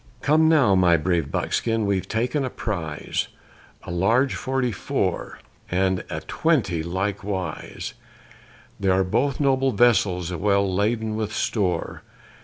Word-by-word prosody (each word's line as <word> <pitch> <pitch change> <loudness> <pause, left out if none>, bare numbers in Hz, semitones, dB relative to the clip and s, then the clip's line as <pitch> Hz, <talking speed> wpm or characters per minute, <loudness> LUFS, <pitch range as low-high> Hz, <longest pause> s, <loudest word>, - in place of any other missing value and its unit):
Come 160 +2 +4
now, 145 -11 +5
my 90 -3 +5
brave 85 -2 0
buckskin, 115 +7 0
we've 100 -2 0
taken 125 +6 0
a 130 - -2
prize, 85 -12 -3 0.6
A - - -7
large 115 +10 +2
forty 130 -2 -1
four, 95 - -2 0.3
and 95 0 +1
a - - -4
twenty 125 - 0
likewise; 95 +2 -4 0.9
They 100 - -1
are 95 +1 +3
both 125 +8 0
noble 135 -2 +2
vessels, 95 -7 +2
well 100 +3 +2
laden 110 +2 0
with 110 -1 -2
store! 95 -6 -1
100 Hz, 125 wpm, -24 LUFS, 90-125 Hz, 0.9 s, now